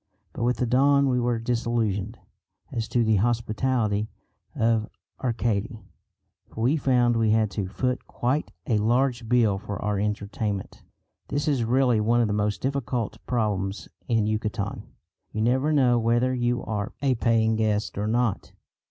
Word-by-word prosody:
But - - -6
with 125 +1 +1
the 125 - 0
dawn 140 +3 +4
we 125 -1 +2
were 120 -1 +1
disillusioned 115 -3 -1 0.5
as 115 -2 -3
to 120 - +1
the 110 -2 +3
hospitality 110 -1 0 0.5
of 115 -1 +1 0.3
Arcady, 115 -2 -1 0.6
for 110 - -8
we 130 +7 +3
found 125 -5 +2
we 115 -1 +2
had 110 -1 +2
to 95 0 -3
"foot" 125 +6 -2
quite 130 +5 -1 0.2
a 110 -4 +1
large 120 +1 +1
bill 115 -5 +3
for 100 0 -6
our 105 -1 -1
entertainment. 105 -1 -3 0.5
This 145 +1 -2
is 140 -5 +2
really 125 -1 +3
one 115 +3 +2
of 120 - +3
the 105 - -1
most 105 0 -1
difficult 130 -4 -2
problems 105 -5 -1 0.2
in 115 -3 +2
Yucatan. 105 -1 -3 0.5
You 110 - -2
never 130 +6 +2
know 125 -5 +4
whether 120 +3 +2
you 120 -1 0
are 105 -2 -3
a 135 -2 +3
paying 115 -2 +2
guest 110 -1 0
or 105 +2 -2
not. 115 -2 -1
115 Hz, 155 wpm, -25 LUFS, 105-125 Hz, 0.6 s, dawn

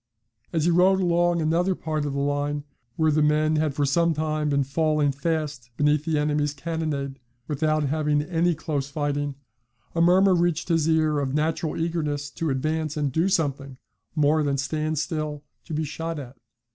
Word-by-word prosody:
As 160 -2 0
he 175 - +4
rode 185 +3 +4
along 175 -2 +2
another 175 +4 +1
part 155 -3 -2
of 145 - -2
the 140 - -2
line 145 +1 -1 0.3
where 160 -1 +2
the 155 +1 +2
men 155 +1 +3
had 155 -3 0
for 145 - +1
some 170 +4 +2
time 155 0 -1
been 140 -1 +2
falling 150 +1 +1
fast 145 -3 -3
beneath 150 +1 +2
the 160 -2 +1
enemy's 150 0 0
cannonade, 145 -3 -3 0.3
without 155 +1 +1
having 150 0 +1
any 170 +1 +1
close 145 -3 -3
fighting, 145 -1 -2 0.6
a 165 - +1
murmur 185 +3 +5
reached 175 -1 +1
his 165 -2 +2
ear 155 -2 +2
of 135 -1 -2
natural 155 +1 -1
eagerness 150 -3 -2
to 165 +1 -2
advance 155 +3 -1
and 145 -2 0
do 165 +7 +1
something 140 -7 -1 0.4
more 155 0 +3
than 140 -2 0
stand 155 +2 -2
still 155 -1 -3 0.2
to 165 - -7
be 155 - 0
shot 165 +2 -4
at. 135 -2 -8
155 Hz, 175 wpm, -25 LUFS, 145-165 Hz, 0.6 s, murmur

